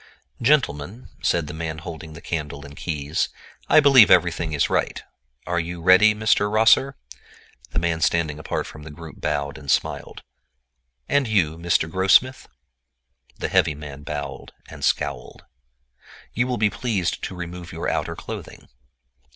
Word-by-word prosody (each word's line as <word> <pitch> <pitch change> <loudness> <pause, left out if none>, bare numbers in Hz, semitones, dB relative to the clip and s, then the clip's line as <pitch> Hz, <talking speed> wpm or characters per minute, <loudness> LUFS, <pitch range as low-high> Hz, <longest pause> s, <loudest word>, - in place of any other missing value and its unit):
"Gentlemen," 115 - +1
said 85 -2 +1
the 75 - -7
man 80 0 -4
holding 80 0 -8
the - - -12
candle 75 -3 -4
and 70 0 -12
keys, 75 -1 -2 0.4
"I - - +7
believe 135 -6 +7
everything 85 -2 +3
is 75 -2 +1
right. - - -1 0.4
Are 85 0 0
you 85 +1 -5
ready, 95 +5 +6
Mr. 105 -1 +2
Rosser?" 115 +5 +4 0.7
The - - -6
man 85 -1 0
standing 80 -2 +1
apart - - -3
from 75 - -11
the 75 - -10
group 80 +1 -11
bowed 75 0 -2
and 70 -2 -11
smiled. - - -1 0.8
"And 140 -2 +2
you, 90 -8 +1
Mr. 85 -1 +1
Grossmith?" 95 +9 +3 0.9
The - - -2
heavy 75 - +2
man 75 -1 -9
bowed 70 -2 -6
and - - -11
scowled. 65 -2 -2 0.9
"You 120 +3 0
will 125 -1 -1
be 105 -1 +2
pleased 100 -9 -2
to 95 - -7
remove 85 -1 -7
your 80 - -4
outer - - -2
clothing." - - -9
85 Hz, 150 wpm, -23 LUFS, 75-105 Hz, 0.9 s, I